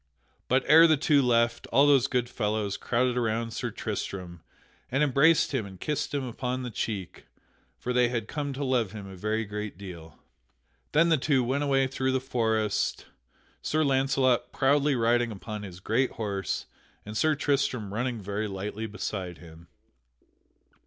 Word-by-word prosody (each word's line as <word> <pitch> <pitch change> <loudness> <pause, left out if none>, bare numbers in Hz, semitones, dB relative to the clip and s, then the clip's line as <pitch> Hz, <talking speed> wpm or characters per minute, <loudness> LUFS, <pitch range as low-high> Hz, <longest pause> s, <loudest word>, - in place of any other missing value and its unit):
But 130 +1 +2
ere 165 +2 +8
the 155 -2 +4
two 145 0 +3
left, 120 -2 +1
all 140 +5 +4
those 135 -3 +5
good 125 -2 0
fellows 105 -3 -2
crowded 125 +2 0
around 115 -1 -1
Sir 120 +1 -3
Tristram, 95 -5 -5 0.5
and 135 +3 +1
embraced 150 +3 +4
him 130 -5 0
and 95 -2 -12
kissed 150 -1 -2
him 140 -2 -1
upon 125 +1 -3
the 125 - -5
cheek; 100 -4 -5 0.5
for 125 - -3
they 125 -1 +3
had 115 -3 -3
come 145 -2 -3
to 140 +2 -4
love 120 -6 0
him 105 -2 -7
a 95 -1 -9
very 110 +4 -1
great 105 -1 -5
deal. 85 -5 -10 0.8
Then 165 +3 +4
the 160 -3 +3
two 135 -2 +2
went 135 +4 0
away 135 -2 +2
through 130 0 -1
the 130 - +2
forest, 110 -5 0 0.6
Sir 155 +1 +1
Launcelot 135 -2 +2
proudly 140 +1 +2
riding 120 0 +2
upon 105 +1 -6
his 95 -3 -9
great 120 +7 0
horse 100 -3 -3 0.4
and 105 +1 -7
Sir 155 +7 +2
Tristram 140 -8 -1
running 120 +1 -2
very 105 +2 -3
lightly 105 +3 -4
beside 95 -4 -5
him. 85 0 -14
120 Hz, 165 wpm, -27 LUFS, 105-135 Hz, 0.8 s, ere